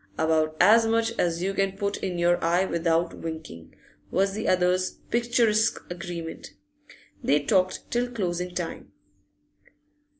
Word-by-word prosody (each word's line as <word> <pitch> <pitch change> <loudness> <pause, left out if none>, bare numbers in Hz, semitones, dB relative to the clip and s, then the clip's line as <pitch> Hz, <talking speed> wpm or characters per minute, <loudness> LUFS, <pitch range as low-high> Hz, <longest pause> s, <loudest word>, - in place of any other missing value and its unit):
'About 155 -1 +1
as 225 +5 +6
much 225 0 +1
as 170 0 0
you 195 +1 -1
can 195 0 -1
put 200 0 -2
in 180 -2 -3
your 175 0 +2
eye 175 +3 +2
without 170 -1 0
winkin',' 160 - -8 0.3
was 195 +1 +1
the 215 +2 -3
other's 185 0 +2 0.2
picturesque 235 -2 +2
agreement. 170 -2 -7 0.7
They 145 +1 +2
talked 185 +4 0
till 245 +1 0
closing 180 -6 -3
time. 175 -2 -5
180 Hz, 130 wpm, -26 LUFS, 170-205 Hz, 0.7 s, as